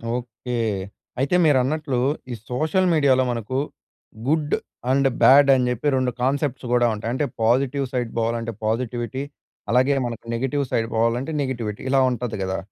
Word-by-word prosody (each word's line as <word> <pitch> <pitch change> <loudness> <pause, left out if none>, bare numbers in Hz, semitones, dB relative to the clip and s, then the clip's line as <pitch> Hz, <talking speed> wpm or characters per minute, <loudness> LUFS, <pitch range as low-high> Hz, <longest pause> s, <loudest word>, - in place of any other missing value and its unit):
Okay. 125 0 -6 0.7
అయితే 140 +6 +1
మీరన్నట్లు, 140 0 +1 0.3
ఈ - - -2 0.2
సోషల్ 155 +9 +1
మీడియాలో 140 -4 +4
మనకు 120 +2 -3 0.7
గుడ్ 150 0 +1 0.4
అండ్ 135 +1 +3
బాడ్ 140 +1 +7
అని 125 -1 +1
చెప్పి 125 +4 -2
2 130 -1 +1
కాన్సెప్ట్స్ 135 0 -1
కూడా 120 -1 +4
ఉంటాయి. 110 +2 -4
అంటే 145 +3 0 0.2
పాజిటివ్ 135 +4 +2
సైడ్ 120 -3 -1
పోవాలంటే 115 0 -1
పాజిటివిటీ. 120 +3 -2 0.5
అలాగే 130 +4 +3
మనకు 115 -1 -6
నెగెటివ్ 135 +4 -1
సైడ్ 115 0 +1
పోవాలంటే 115 +6 +1
నెగటివిటీ. 120 -6 -3
ఇలా 135 0 +4
ఉంటది 120 -3 -3
కదా! 95 0 -2
125 Hz, 140 wpm, -23 LUFS, 115-140 Hz, 0.7 s, బాడ్